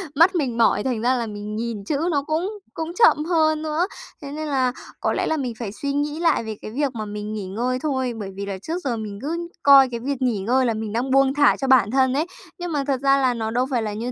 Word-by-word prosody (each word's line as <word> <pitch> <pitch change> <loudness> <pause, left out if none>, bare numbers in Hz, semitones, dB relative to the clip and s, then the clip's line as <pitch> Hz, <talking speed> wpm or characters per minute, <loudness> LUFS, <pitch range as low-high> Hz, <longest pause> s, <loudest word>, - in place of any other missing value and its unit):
mắt 335 +6 +5
mình 265 -8 -1
mỏi 225 -3 +3
thành 245 -4 -1
ra 245 +2 +3
là 235 - -2
mình 210 0 -6
nhìn 225 -2 -4
chữ 285 - -1
nó 285 -2 +1
cũng 365 +7 -2
cũng 325 +1 -4
chậm 360 -9 +4
hơn 315 -2 +2
nữa. 315 +4 0 0.3
Thế 280 -1 -7
nên 310 +1 -4
là 260 -3 +1 0.3
có - - 0
lẽ - - 0
là 315 - 0
mình 255 -4 -3
phải 225 -5 -4
suy 280 +7 -3
nghĩ 295 +2 -1
lại 330 -8 +2
về 220 -1 -5
cái - - -7
việc 270 +1 -1
mà 215 -2 -4
mình 210 +1 -5
nghỉ 205 -3 -4
ngơi 245 +6 -1
thôi, 260 -5 -1
bởi 200 -2 -5
vì 200 +1 -4
là 200 -1 -4
trước 325 - -4
giờ 245 -4 -1
mình 210 -2 -6
cứ 335 +4 -3 0.2
coi 275 -2 +8
cái 235 -1 -4
việc 275 +2 -3
nghỉ 245 -5 +1
ngơi 250 +7 +2
là 230 - +1
mình 220 -1 -4
đang 255 +3 -1
buông 270 0 +4
thả 290 0 +4
cho 270 - -2
bản 250 -6 +5
thân 260 0 +3
ấy. 295 +4 +1 0.3
Nhưng 350 -1 -4
mà 290 -3 0
thật 265 -2 0
ra 275 0 +4
là 260 -2 +2
nó 220 -2 -3
đâu 250 +2 +1
phải 245 -3 +1
là 210 -1 -3
như 235 +4 -4
260 Hz, 275 wpm, -23 LUFS, 225-295 Hz, 0.3 s, coi